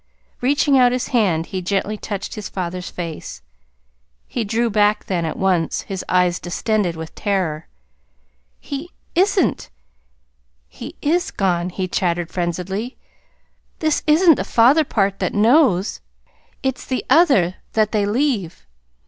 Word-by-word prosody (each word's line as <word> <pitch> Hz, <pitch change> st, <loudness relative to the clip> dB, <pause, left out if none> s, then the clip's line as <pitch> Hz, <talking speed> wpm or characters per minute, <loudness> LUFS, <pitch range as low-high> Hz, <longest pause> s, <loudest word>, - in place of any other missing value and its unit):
Reaching 280 Hz, +1 st, +3 dB
out 245 Hz, -1 st, +5 dB
his 250 Hz, 0 st, -2 dB
hand, 185 Hz, -9 st, +1 dB
he 185 Hz, +1 st, -4 dB
gently 200 Hz, +3 st, -1 dB
touched 205 Hz, -1 st, -5 dB
his 210 Hz, -1 st, -6 dB
father's 180 Hz, -1 st, -4 dB
face. 165 Hz, -, -7 dB, 0.8 s
He 240 Hz, -, -3 dB
drew 225 Hz, +3 st, 0 dB
back 210 Hz, 0 st, +2 dB
then, 175 Hz, -3 st, -1 dB
at 160 Hz, -, -4 dB
once, 180 Hz, -4 st, +1 dB
his 195 Hz, -2 st, -6 dB
eyes 180 Hz, -1 st, +2 dB
distended 185 Hz, 0 st, -1 dB
with 160 Hz, 0 st, -8 dB
terror. 185 Hz, -7 st, -2 dB, 0.9 s
"He 285 Hz, +5 st, -6 dB, 0.2 s
isn't! 375 Hz, -, +1 dB, 1.0 s
He -, -, -10 dB
is 345 Hz, +5 st, +1 dB
gone," 180 Hz, -2 st, 0 dB
he 185 Hz, +1 st, -3 dB
chattered 175 Hz, -2 st, -1 dB
frenziedly. 185 Hz, +7 st, -3 dB, 0.8 s
"This 310 Hz, -1 st, 0 dB
isn't 320 Hz, +1 st, +6 dB
the -, -, -1 dB
father 260 Hz, +7 st, +4 dB
part 200 Hz, -7 st, 0 dB
that -, -, -2 dB
KNOWS. 215 Hz, -, +3 dB, 0.6 s
It's 265 Hz, -1 st, -2 dB
the 255 Hz, -, -2 dB
other 260 Hz, -, +4 dB, 0.2 s
that 215 Hz, -1 st, +2 dB
they 205 Hz, -2 st, +1 dB
leave. 220 Hz, -, -1 dB
205 Hz, 130 wpm, -20 LUFS, 180-255 Hz, 1.0 s, isn't